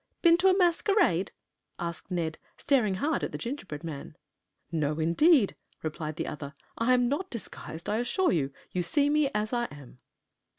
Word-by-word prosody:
"Been 335 -1 +7
to 370 +2 +3
a 375 0 +5
masquerade?" 350 - +3 0.5
asked 170 -1 -5
Ned, 165 -3 -2 0.2
staring 230 -9 +2
hard 290 +9 0
at - - -2
the - - -4
gingerbread 195 - -5
man. 150 -2 -7 0.6
"No, 155 -2 0
indeed," 205 - +4 0.3
replied 155 -1 -4
the - - -3
other. 145 -1 -6 0.2
"I 245 +2 +3
am 245 -1 +3
not 300 +9 -1
disguised, 180 -7 -7
I 210 - +1
assure 360 +10 +1
you. 140 -5 0 0.2
You 180 - 0
see 285 - +2
me 300 -2 +3
as 215 +2 -1
I 240 0 +1
am." 145 - -12
210 Hz, 170 wpm, -29 LUFS, -, 0.6 s, Been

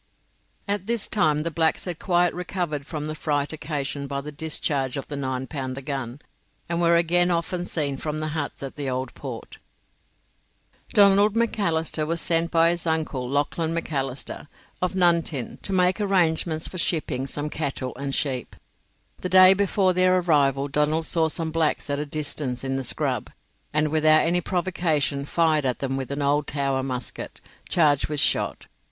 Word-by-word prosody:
At 200 -1 -2
this 230 -2 +3
time 155 -7 +1
the 170 - -2
blacks 160 0 +1
had 175 -3 -5
quite 175 -2 +2
recovered 175 -5 -3
from 150 -2 -4
the 155 - -3
fright 145 -1 -1
occasioned 145 -2 -4
by 140 -1 -2
the 150 +2 -7
discharge 145 -3 -2
of 135 - -5
the 145 - -4
nine 130 -2 -3
pounder 130 -2 -5
gun, 135 -1 -5 0.5
and 170 0 -1
were 170 0 +4
again 175 +1 +3
often 175 +1 -1
seen 145 -4 -2
from 150 +2 -3
the 155 0 -3
huts 150 -3 -4
at 135 - -7
the 140 -2 -3
Old 130 0 -3
Port. - - -8 1.4
Donald 200 +1 +5
Macalister 165 -9 0
was 165 +1 -1
sent 165 0 +1
by 165 0 +4
his 170 0 -3
uncle, 155 -6 -1
Lachlan 160 +4 0
Macalister, 140 -4 -3 0.3
of 180 +1 0
Nuntin, 170 -7 +1
to - - -5
make 185 +2 +2
arrangements 165 -5 +1
for 185 - -7
shipping 150 -6 -1
some 145 +2 -3
cattle 135 -4 -3
and 140 +1 -3
sheep. 130 -5 -2 0.6
The 180 - -4
day 185 +1 +8
before 195 -1 +2
their 185 0 +4
arrival 140 -5 +2
Donald 150 +3 +1
saw 165 0 +2
some 160 0 -3
blacks 155 -2 0
at 140 - -1
a 150 - -3
distance 145 -4 -1
in 135 0 -2
the 135 - -2
scrub, - - -1 0.4
and 150 +1 +1
without 155 0 +4
any 175 +2 +1
provocation 165 -7 0
fired 155 -1 +2
at 130 -2 0
them 135 -1 -2
with 135 -1 -4
an 140 +1 -2
old 145 +1 +1
Tower 140 -2 -1
musket, 130 -2 -5 0.3
charged 150 -5 +3
with 150 -1 -3
shot. - - 0
155 Hz, 170 wpm, -24 LUFS, 140-170 Hz, 1.4 s, day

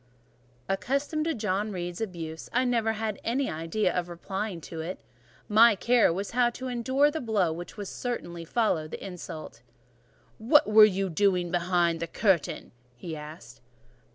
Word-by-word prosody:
Accustomed 280 +10 -1
to 325 -2 0
John 210 -1 -1
Reed's 175 0 -5
abuse, 165 -6 -5
I 250 +2 +2
never 230 -3 +1
had 215 -1 -3
an 235 +4 0
idea 175 - -1
of 175 -1 -1
replying 190 +2 -4
to 165 +1 -8
it; 175 +4 -5 0.5
my 220 +1 +6
care 235 +2 +3
was 195 +4 -3
how 245 0 +3
to 255 +2 -7
endure 260 +4 +2
the 315 - -4
blow 205 -8 +1
which 175 +2 -8
would 205 -1 -5
certainly 175 -10 -5
follow 170 -5 0
the - - -8
insult. 175 -8 -8 0.8
"What 260 +7 +5
were 215 0 +8
you 195 -1 0
doing 180 -1 +1
behind 175 -1 +1
the 170 - -3
curtain?" 185 -8 0 0.2
he 160 +6 -7
asked. 150 -5 -10
195 Hz, 155 wpm, -28 LUFS, 170-230 Hz, 0.8 s, were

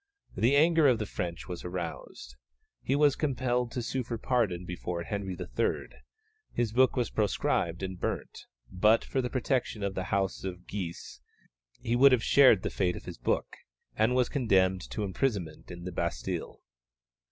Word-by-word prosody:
The 125 +5 +3
anger 160 +1 +5
of 125 -3 +4
the 110 - -3
French 85 -4 -5
was 90 - -6
aroused. 85 -7 -6 0.5
He 135 - 0
was 145 -1 +4
compelled 125 -4 0
to 125 - -2
sue 130 +3 -2
for 120 -1 -4
pardon 110 -8 0
before 90 -1 -4
Henry 95 -2 -4
III.; - - -2 0.6
his 120 -3 -1
book 130 +2 +4
was 120 -3 -1
proscribed 95 -4 0
and 95 -1 -4
burnt; - - -4 0.2
but 105 +5 +3
for 130 - -1
the 125 - -3
protection 125 -4 -1
of 100 -1 -1
the 95 -1 -3
House 95 -1 -1
of 90 -1 -6
Guise, 85 -10 -6 0.6
he 115 - 0
would 135 +2 +7
have 120 -3 +2
shared 130 -8 +6
the - - -2
fate 90 -2 0
of - - -9
his - - -8
book, - - -1 0.4
and 110 +4 +2
was 125 -1 +3
condemned 95 -8 +2
to 105 - -3
imprisonment 95 - -2
in 85 -1 -8
the 90 - -5
Bastille. 85 -9 -3
105 Hz, 170 wpm, -29 LUFS, 90-125 Hz, 0.6 s, would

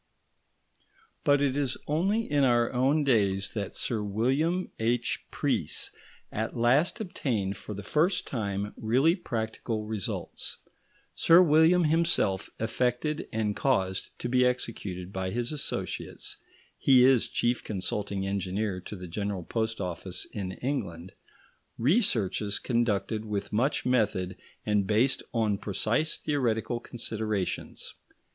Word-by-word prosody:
But 145 0 +4
it 135 -2 +1
is 140 -3 0
only 190 +9 +1
in 145 -7 +1
our 120 -2 +3
own 135 +5 +3
days 100 -7 +2
that 100 -4 -4
Sir 115 -3 0
William 135 - 0
H. 120 +2 0
Preece - - -1 0.4
at 110 +3 -3
last 135 - +3
obtained 115 - -2
for 105 +2 -7
the 105 - -6
first 165 - +2
time 100 -4 -3
really 130 +9 +3
practical 110 - -3
results. 105 -3 -4 0.6
Sir 165 +2 +6
William 165 +1 +6
himself 160 - +2
effected 125 +6 -1
and 105 -2 -1
caused 95 -9 0
to - - -3
be 125 +1 +3
executed 100 -7 -2
by 95 0 -2
his 120 +5 -2
associates 150 -2 -3 0.4
he 130 -2 +6
is 130 -3 +4
chief 120 +1 0
consulting 100 0 -2
engineer 95 0 -2
to 105 - -7
the 90 -2 -8
General 100 +1 -3
Post 110 +3 -2
Office 90 0 -3
in 95 -3 -4
England 95 - -3 0.7
researches 115 - +2
conducted 110 -3 0
with 105 -2 -4
much 125 +7 +1
method 100 -7 +1 0.3
and 105 -2 +2
based 115 +6 +3
on 110 -4 +1
precise 110 +9 0
theoretical 120 -5 0
considerations. 110 -5 -3
115 Hz, 125 wpm, -28 LUFS, 100-135 Hz, 0.7 s, Sir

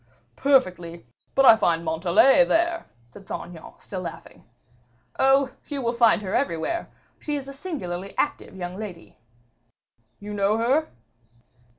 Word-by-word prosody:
"Perfectly; 180 - +1 0.3
but 270 - +4
I 225 - +9
find 170 -6 0
Montalais 185 - +4
there," 335 +4 0 0.2
said 155 +12 -16
Saint - - -5
Aignan, 165 -2 -12
still 185 -2 -7
laughing. 170 -2 -9 0.8
"Oh! 270 0 +4 0.2
you 285 -2 -4
will 235 -2 -1
find 235 -3 +3
her 190 - -4
everywhere. 275 - -1 0.3
She 295 - -3
is 275 -2 -5
a 275 - -8
singularly 200 - -6
active - - -2
young 180 0 -6
lady." 190 -6 -9 1.0
"You 210 +1 -7
know 205 +1 +1
her?" 260 +7 +1
215 Hz, 135 wpm, -24 LUFS, 175-275 Hz, 1.0 s, I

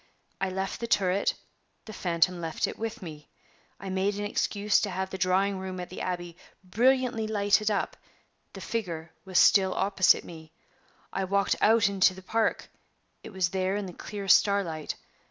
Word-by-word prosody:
I 195 - 0
left 190 +1 -3
the 235 - -3
turret; 195 -2 +1 0.5
the 215 - -9
phantom 175 -1 0
left 165 -1 -1
it - - -7
with 225 0 -5
me. 150 -3 -10 0.5
I 195 - -7
made 195 +2 0
an 205 - -3
excuse 205 0 +1
to 210 - -1
have 190 0 -3
the 190 - -4
drawing 190 +1 +1
room 185 -1 -5
at 180 - -6
the 185 - -7
Abbey 175 -2 -4 0.3
brilliantly 240 +3 +1
lighted 205 0 +2
up; 205 - -1 0.6
the - - -9
figure 170 -8 -4
was 185 -2 -1
still 190 -1 +5
opposite 195 -2 +3
me. 160 -2 -12 0.6
I 195 - -1
walked 200 +1 +1
out 225 0 +5
into 190 -2 +3
the 190 - -12
park; 225 +4 0 0.5
it - - -10
was 190 -3 0
there 190 +1 -1
in 205 -1 -2
the 180 - -8
clear 200 +1 -7
starlight. 185 -6 +2
190 Hz, 170 wpm, -28 LUFS, 180-205 Hz, 0.6 s, still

